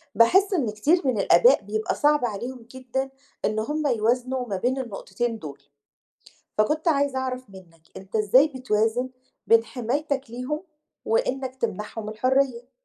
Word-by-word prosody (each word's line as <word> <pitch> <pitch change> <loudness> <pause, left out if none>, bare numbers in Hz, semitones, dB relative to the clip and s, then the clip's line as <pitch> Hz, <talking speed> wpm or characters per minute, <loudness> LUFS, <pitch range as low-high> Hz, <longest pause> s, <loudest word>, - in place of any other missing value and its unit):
باحس 380 - +5
إن 265 - +1
كتير 295 +12 +2
من 235 -6 +1
الآباء 245 +10 +5
بيبقى 215 +2 -2
صعب 295 -3 +3
عليهم 235 +2 -5
جدًا 260 +1 -3 0.4
إن 215 +1 0
هم 295 +6 -1
يوازنوا 250 +2 0
ما 200 - -2
بين 250 +7 0
النقطتين 230 -1 -4
دول. 140 -2 -9 1.0
فكنت 305 +10 +2
عايزة 280 -3 +2
أعرف 255 -3 -4
منك، 175 -4 -15
أنت 195 +3 -6
إزاي 235 +8 +5
بتوازن 250 -2 0 0.4
بين 230 0 +5
حمايتك 260 +3 -2
ليهم 255 +6 -4 0.4
وإنك 265 - -1
تمنحهم 215 -1 -4
الحرية؟ 255 +2 0
250 Hz, 135 wpm, -25 LUFS, 215-270 Hz, 1.0 s, باحس